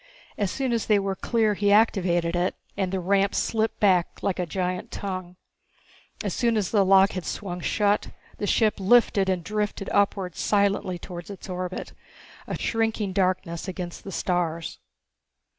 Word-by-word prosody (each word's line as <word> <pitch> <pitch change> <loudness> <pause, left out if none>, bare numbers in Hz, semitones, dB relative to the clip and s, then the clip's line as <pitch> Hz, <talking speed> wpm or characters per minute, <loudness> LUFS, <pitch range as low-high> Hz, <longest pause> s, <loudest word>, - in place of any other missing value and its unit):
As 200 -2 -1
soon 260 +3 -1
as 230 - -1
they 210 - +5
were 195 -1 -1
clear 220 0 +1
he 205 0 +1
activated 180 -5 +3
it 175 +1 0 0.2
and 190 -2 -1
the 190 - -1
ramp 195 +2 +2
slipped 225 0 0
back 185 -5 +2
like 190 -2 0
a 180 - -1
giant 180 +1 -2
tongue. 185 -2 -5 0.9
As - - -2
soon 235 -2 +1
as 200 -4 -1
the 205 -3 +4
lock 195 0 +5
had 185 - -4
swung 180 -2 -4
shut, 205 +3 +1 0.3
the 205 - -2
ship 220 0 +2
lifted 200 -1 +4
and 185 -2 0
drifted 210 0 -2
upwards 195 -3 0
silently 200 -3 +1
towards 175 0 -8
its 200 -2 -9
orbit, 185 0 -5 0.5
a - - -3
shrinking 225 -3 -1
darkness 185 -3 0
against 180 -2 -6
the 195 - -7
stars. 170 -3 -2
195 Hz, 160 wpm, -25 LUFS, 180-205 Hz, 0.9 s, they